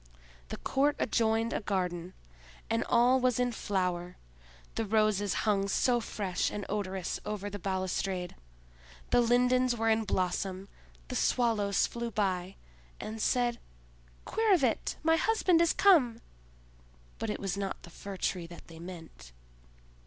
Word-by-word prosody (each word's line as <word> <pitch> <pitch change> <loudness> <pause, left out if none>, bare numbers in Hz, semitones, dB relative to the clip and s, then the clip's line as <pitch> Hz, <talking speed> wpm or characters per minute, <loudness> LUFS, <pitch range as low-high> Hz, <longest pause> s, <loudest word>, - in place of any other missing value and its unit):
The - - -5
court 285 +2 +1
adjoined 225 0 +1
a - - 0
garden, 180 -4 -2 0.6
and 115 - +1
all 250 +2 +5
was 250 -1 +1
in 245 0 +2
flower; 180 -5 -2 0.6
the 225 - -1
roses 215 -2 +1
hung 200 -2 +2
so 240 +4 +2
fresh 200 -5 -2
and 205 -1 -5
odorous 190 -3 -3
over 205 -1 -4
the 205 - -5
balustrade, 185 -1 -2 0.8
the 245 - +5
lindens 250 +1 +3
were 225 0 +1
in 220 0 +3
blossom, 190 0 -2 0.4
the - - -4
Swallows 215 -5 +2
flew 235 0 -4
by, 195 -3 -1 0.4
and 220 +1 -5
said 240 0 +1 0.7
"Quirre 440 -4 +3
vit! 260 -7 0
my 325 0 +4
husband 365 -4 +3
is 335 - +4
come!" 260 - +4 1.0
but 225 - -3
it - - -3
was 195 -2 -2
not 195 -1 -4
the 175 - -12
Fir 195 +3 -8
tree 180 -2 -2
that 170 0 -13
they 165 -1 -11
meant. 165 - -10
210 Hz, 140 wpm, -30 LUFS, 185-240 Hz, 1.0 s, all